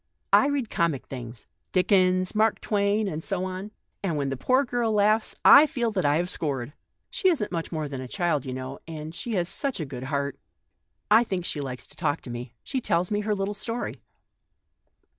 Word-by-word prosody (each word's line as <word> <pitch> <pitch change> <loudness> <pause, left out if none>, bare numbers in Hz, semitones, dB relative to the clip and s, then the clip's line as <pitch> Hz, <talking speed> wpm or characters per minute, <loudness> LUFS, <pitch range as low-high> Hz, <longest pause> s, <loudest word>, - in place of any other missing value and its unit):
I 275 - +7
read 280 -6 -1
comic 170 -7 0
things 120 -3 -7
— - - -50
Dickens, 185 -1 +3
Mark 215 0 +2
Twain, 205 0 +1
and 160 -3 -4
so 190 -3 -2
on; 185 +2 -5 0.3
and 170 -6 -1
when 140 -1 -1
the 135 - -2
poor 255 - +2
girl 240 -2 0
laughs, 215 +1 +2
I 295 +2 +10
feel 245 -6 -1
that 190 -6 -1
I 145 +1 +3
have 175 +1 0
scored 140 -8 -2
one. - - -21 0.4
She 375 - +2
isn't 275 - 0
much 165 -2 -3
more 155 -3 -2
than 135 -2 -5
a 130 - -6
child, 170 -2 0
you 130 - -5
know, 130 +1 -6
and 155 -1 -6
she 230 +6 -4
has 175 -2 +1
such 275 +4 -2
a 155 - -2
good 130 -2 -7
heart. 140 0 -2 0.7
I 225 +3 +7
think 190 -6 -3
she 150 - -1
likes 130 -2 -5
to - - -15
talk 145 - -1
to 125 - -8
me; 120 0 -7
she 265 -2 -2
tells 175 -3 0
me 205 - +1
her 210 0 0
little 195 +1 -2
story." 230 +3 -3
185 Hz, 215 wpm, -26 LUFS, 145-215 Hz, 0.7 s, I